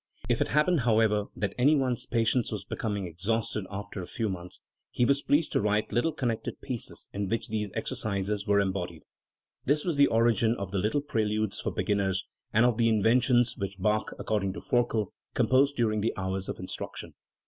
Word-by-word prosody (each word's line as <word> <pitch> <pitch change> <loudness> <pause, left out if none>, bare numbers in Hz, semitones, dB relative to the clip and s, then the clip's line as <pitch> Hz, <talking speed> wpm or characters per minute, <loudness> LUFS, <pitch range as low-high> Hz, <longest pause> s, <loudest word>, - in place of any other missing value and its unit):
If - - +1
it - - +2
happened, 155 +3 +3
however, 110 -3 +3
that 105 - -2
any 145 +5 +5
one's 130 -4 0
patience 115 0 +1
was 100 -3 -4
becoming 105 -2 -3
exhausted 100 +3 -2
after 100 0 -6
a 90 - -7
few 110 -2 -2
months, 90 -1 -6 0.3
he 120 - +1
was 140 +2 +3
pleased 150 +2 +2
to - - +1
write 105 +1 +1
little 140 +8 +1
connected 120 -7 -3
pieces, 125 -4 -5
in 100 -1 -2
which 115 - -1
these 105 -2 -2
exercises 100 0 -2
were 100 0 +4
embodied."* 90 -4 -2 0.6
This 150 +2 +2
was 170 -5 0
the 140 - +6
origin 115 0 +3
of 100 -2 -5
the 100 - 0
Little 110 +9 +1
Preludes 110 -6 0
for - - -2
beginners, 100 -2 0 0.3
and 110 +3 +4
of 120 -3 +2
the 115 -1 +4
Inventions, 120 +3 +3
which 100 -1 -4
Bach, 105 +2 0
according 100 -3 -1
to - - -6
Forkel, 120 -4 0 0.2
composed 140 +2 +3
during 110 -4 +1
the 115 - -1
hours 95 0 -3
of - - -4
instruction. - - -6
110 Hz, 185 wpm, -28 LUFS, 100-120 Hz, 0.6 s, the